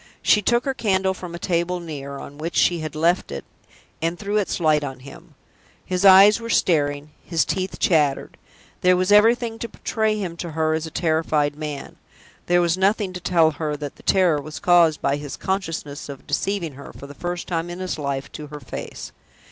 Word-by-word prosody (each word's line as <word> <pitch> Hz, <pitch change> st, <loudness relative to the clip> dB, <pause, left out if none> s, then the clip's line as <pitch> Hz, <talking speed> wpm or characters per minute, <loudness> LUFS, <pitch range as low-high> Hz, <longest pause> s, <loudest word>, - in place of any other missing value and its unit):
She 210 Hz, -, +4 dB
took 240 Hz, +4 st, +1 dB
her 270 Hz, -, 0 dB
candle 190 Hz, -5 st, +1 dB
from 180 Hz, -2 st, -8 dB
a -, -, -5 dB
table 175 Hz, +1 st, -1 dB
near, 140 Hz, -4 st, -7 dB
on 145 Hz, +1 st, -10 dB
which 165 Hz, +2 st, -4 dB
she 175 Hz, -1 st, +3 dB
had 155 Hz, -1 st, -6 dB
left 170 Hz, -, +1 dB
it, 70 Hz, -1 st, -6 dB, 0.6 s
and 165 Hz, +2 st, -1 dB
threw 205 Hz, +2 st, -2 dB
its 205 Hz, -3 st, -1 dB
light 155 Hz, -3 st, +3 dB
on 135 Hz, -2 st, -6 dB
him. 140 Hz, +1 st, -13 dB, 0.5 s
His 185 Hz, 0 st, -2 dB
eyes 195 Hz, +3 st, +8 dB
were 230 Hz, 0 st, -7 dB
staring, 150 Hz, -7 st, +1 dB
his 165 Hz, -2 st, 0 dB
teeth 185 Hz, 0 st, -3 dB
chattered. 150 Hz, -9 st, +1 dB, 0.5 s
There 180 Hz, 0 st, +4 dB
was 185 Hz, +2 st, +1 dB
everything 225 Hz, +2 st, +4 dB
to 235 Hz, -, -4 dB
betray 220 Hz, -1 st, -1 dB
him 180 Hz, -5 st, -4 dB
to 170 Hz, -2 st, -6 dB
her 160 Hz, 0 st, +1 dB
as 160 Hz, 0 st, -2 dB
a -, -, -7 dB
terrified 155 Hz, -3 st, 0 dB
man; 150 Hz, -2 st, -6 dB, 0.5 s
there 175 Hz, 0 st, +4 dB
was 170 Hz, +1 st, +1 dB
nothing 195 Hz, 0 st, +1 dB
to 180 Hz, -, -5 dB
tell 170 Hz, -3 st, +3 dB
her 150 Hz, 0 st, -3 dB
that 145 Hz, -1 st, -7 dB
the -, -, -16 dB
terror 175 Hz, -6 st, +3 dB
was 155 Hz, +2 st, -8 dB
caused 170 Hz, -4 st, +4 dB
by 140 Hz, +1 st, +1 dB
his 145 Hz, -1 st, -7 dB
consciousness 165 Hz, -7 st, -4 dB
of 140 Hz, -2 st, -9 dB
deceiving 195 Hz, -6 st, -2 dB
her, 140 Hz, +2 st, -11 dB
for -, -, -11 dB
the 140 Hz, -, -10 dB
first 175 Hz, +4 st, -5 dB
time 170 Hz, -1 st, -2 dB
in 175 Hz, -, -6 dB
his 185 Hz, -3 st, -4 dB
life, 140 Hz, -1 st, -3 dB
to 150 Hz, -, -8 dB
her 150 Hz, 0 st, -9 dB
face. -, -, -8 dB
170 Hz, 205 wpm, -22 LUFS, 150-190 Hz, 0.6 s, eyes